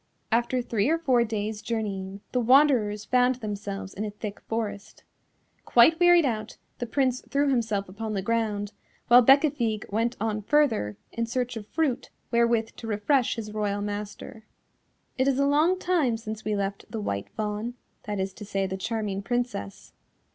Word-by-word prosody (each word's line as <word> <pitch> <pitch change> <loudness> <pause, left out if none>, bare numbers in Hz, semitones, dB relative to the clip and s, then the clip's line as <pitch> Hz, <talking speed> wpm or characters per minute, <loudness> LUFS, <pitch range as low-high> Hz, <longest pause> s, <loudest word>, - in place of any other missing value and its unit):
After 240 +2 +1
three 230 0 0
or 325 - +3
four 260 -7 +3
days' 215 -1 -3
journeying, 200 -4 -4
the 250 - +1
wanderers 240 -5 +4
found 250 0 +3
themselves 205 -4 -5
in 205 - -4
a 215 - -2
thick 205 0 -7
forest. 215 -2 -5 0.6
Quite 280 +8 +5
wearied 350 -2 +6
out, 215 -4 -3 0.2
the 240 - -3
Prince 255 0 +1
threw 280 +1 +2
himself 220 -6 0
upon 215 +3 -5
the 195 -2 -2
ground, 210 -2 -1 0.4
while 245 +1 +8
Bécafigue 265 -5 +3
went 230 +3 0
on 215 0 -1
further 220 - +1
in 230 0 -2
search 245 +1 -2
of 215 -2 -7
fruit 300 -4 -1 0.2
wherewith 235 -1 +2
to 230 - -7
refresh 225 +5 +1
his 215 -2 -6
royal 205 -1 -1
master. 210 +1 -6 0.7
It 260 - +3
is 270 -2 +2
a 280 - +3
long 305 +6 +3
time 335 -11 +1
since 220 -1 -7
we 215 -1 -1
left 200 0 -3
the 225 - -4
White 100 - -3
Fawn, 215 +2 -3 0.3
that 205 -1 -3
is 190 0 -2
to 210 - -10
say 195 -1 -1
the 190 0 -3
charming 205 -1 -2
Princess. 240 - -3
225 Hz, 170 wpm, -26 LUFS, 205-250 Hz, 0.7 s, while